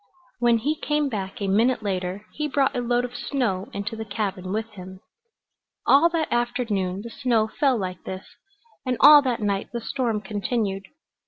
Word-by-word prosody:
When 240 -1 +4
he 275 +7 0
came 295 -1 0
back 200 -1 -5
a - - 0
minute 225 +4 +2
later 190 0 -3
he 300 0 -2
brought 280 -1 +1
a 245 - 0
load 245 0 +1
of 245 0 -9
snow 240 -7 -2
into 205 +2 -4
the 220 - -5
cabin 200 -3 -3
with 220 +2 -2
him. 190 -2 -10 0.9
All 290 +5 +6
that 330 -2 -1
afternoon 230 -6 -1
the 235 - -8
snow 240 -5 +1
fell 265 +3 +1
like 185 -3 -5
this, 190 0 -6 0.6
and 255 -2 -1
all 295 0 +9
that 245 -5 -1
night 200 -1 -1
the 235 - -3
storm 235 -2 -1
continued. 205 -1 -2
225 Hz, 175 wpm, -24 LUFS, 195-250 Hz, 0.9 s, all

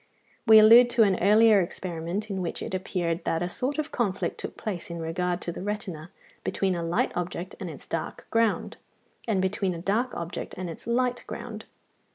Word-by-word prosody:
We 220 0 +9
allude 230 +3 +9
to 240 -1 +4
an 195 -3 +2
earlier 210 +1 +6
experiment, 175 +3 -4
in 190 -1 -2
which 170 - -4
it - - -6
appeared 180 -2 -2
that 165 +1 0
a - - -1
sort 255 - -2
of 310 - -2
conflict 200 -6 -1
took - - -6
place 190 -6 -5
in 170 0 -5
regard 175 +2 -2
to 170 - -3
the 175 - -7
retina 185 -5 -4 0.3
between 190 -1 0
a 170 - -2
light 170 +1 0
object 175 +1 -4
and 185 - -5
its 150 - -9
dark 165 - -4
ground, 230 -1 +1 0.5
and 210 -4 +1
between 190 -1 0
a - - -6
dark 220 +8 0
object 170 0 -5
and 180 -2 -4
its 165 - -11
light 245 +1 0
ground - - -7
(16). - - -34
190 Hz, 200 wpm, -27 LUFS, 170-220 Hz, 0.5 s, We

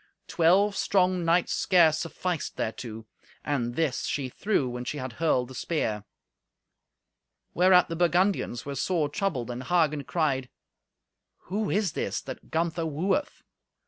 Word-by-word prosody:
Twelve 190 +5 +3
strong 185 -2 +2
knights 170 +1 +2
scarce 165 -4 +4
sufficed 170 0 -3
thereto. 110 0 -5 0.4
And 120 -5 -1
this 160 -6 0
she 135 -3 -2
threw 190 - 0
when 125 0 -5
she 135 +4 -4
had 130 -3 -5
hurled 130 -6 +2
the - - -9
spear. 110 -6 -2 1.5
Whereat 180 0 +5
the 165 - -4
Burgundians 175 - +1
were 140 - -4
sore 155 +2 0
troubled, 145 - -2
and 125 +1 -5
Hagen 155 -3 +2
cried, 135 -6 0 1.0
"Who 210 +1 -1
is 205 -4 +1
this - - -2
that 130 - -9
Gunther 165 0 -1
wooeth? 185 - -1
160 Hz, 135 wpm, -27 LUFS, 130-180 Hz, 1.5 s, Whereat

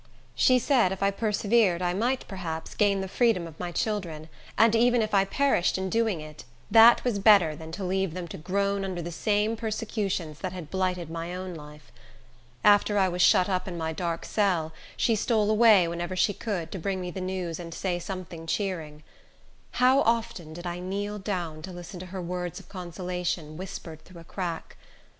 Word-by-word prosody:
She 255 - +4
said 245 -6 +3
if 190 0 -3
I 200 - +3
persevered 210 -2 +2
I 180 -1 0
might, 245 +7 -1
perhaps, 165 -4 -5
gain 200 -2 +2
the 190 - -3
freedom 220 -3 +2
of 160 -2 -11
my 175 -1 -4
children; 170 -7 -3 0.3
and 225 0 +5
even 240 +1 +4
if 215 - -4
I 195 -1 +4
perished 235 -5 +1
in 190 0 -3
doing 225 -7 +1
it, 155 -1 -10 0.3
that 230 +1 +8
was 235 -5 0
better 195 -7 +5
than 160 +1 -9
to 195 - -5
leave 190 -2 -1
them 180 -2 -5
to - - -7
groan 200 +4 0
under 185 -3 -4
the 175 - -5
same 210 +4 0
persecutions 205 -8 -3
that 185 0 -4
had 175 -5 -8
blighted 180 -3 -1
my 165 +2 -4
own 185 0 -5
life. 150 -1 -12 0.7
After 205 0 +5
I 190 -2 +3
was 180 0 -2
shut 180 - +5
up 185 -1 -1
in 175 -2 -5
my 160 -1 -2
dark 170 0 -3
cell, 175 -7 0 0.2
she 230 - +2
stole 215 -1 +1
away, 215 -5 +6
whenever 170 +2 -4
she 185 +3 +2
could, 185 -7 -4
to 190 - -5
bring 190 +2 -2
me 180 -1 -4
the 190 - -6
news 185 -3 -3
and 170 -1 -7
say 175 +1 -2
something 175 -3 -7
cheering. 160 -6 -3 0.7
How 260 +2 +4
often 225 -8 -1
did 175 +2 -9
I 175 0 -4
kneel 200 +3 -4
down 175 -6 -4
to 185 - -7
listen 175 +1 -9
to 185 - -8
her 185 0 -6
words 180 +1 -4
of 195 - -15
consolation, 180 -3 -4
whispered 165 -3 -8
through 175 -2 -13
a - - -13
crack! 170 -1 -5
185 Hz, 195 wpm, -27 LUFS, 170-205 Hz, 0.7 s, that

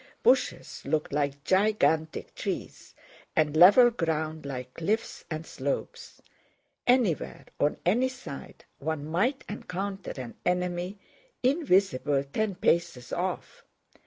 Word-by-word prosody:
Bushes - - +2
looked 155 -2 -1
like 140 -1 -1
gigantic 185 -5 +1
trees - - -5 0.4
and 155 -1 +2
level 205 +9 +8
ground 160 -6 -2
like 130 -2 -6
cliffs 210 +7 -2
and 155 0 -4
slopes. 140 -2 -5 0.6
Anywhere, 245 - +2
on 145 - +2
any 240 +9 +3
side, 250 - -9
one 150 0 -3
might 220 - 0
encounter 195 -1 -5
an 120 -2 -6
enemy 180 +2 -1 0.5
invisible 190 - +2
ten 200 +8 -2
paces 150 -9 0
off. - - -3
175 Hz, 105 wpm, -28 LUFS, 150-210 Hz, 0.6 s, level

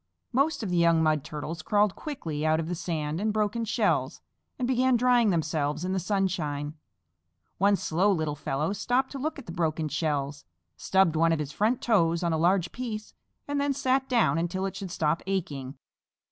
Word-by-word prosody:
Most 275 0 +1
of 195 - -3
the 175 - +1
young 170 -1 +4
Mud 155 -3 +2
Turtles 160 +1 -6
crawled 205 +2 +2
quickly 165 - -5
out 155 0 +2
of 165 - -3
the 175 - -2
sand 160 -1 -3
and 215 +1 +1
broken 215 +2 0
shells, 220 - 0 0.4
and 250 -4 -1
began 255 0 +3
drying 245 -2 +4
themselves 155 -2 -1
in 185 - -1
the 190 - 0
sunshine. 170 -7 -1 0.9
One 200 +2 +4
slow 190 +3 +1
little 155 -5 0
fellow 145 +4 -2
stopped 250 +5 0
to 275 - -6
look 310 +4 -2
at 275 - -9
the - - -7
broken 160 -2 -1
shells, 145 -2 -2 0.3
stubbed 190 - +2
one 165 +1 +3
of 165 - +2
his 150 -2 -4
front 220 +9 0
toes 170 -7 +2
on 170 -1 +1
a - - +1
large 175 +1 +2
piece 225 -4 -5 0.3
and 285 0 -1
then 285 0 +1
sat 265 -1 0
down 235 -9 +3
until 175 +3 -1
it 195 - -4
should 195 -2 -5
stop 160 -1 0
aching. 145 -8 -3
175 Hz, 190 wpm, -27 LUFS, 155-220 Hz, 0.9 s, young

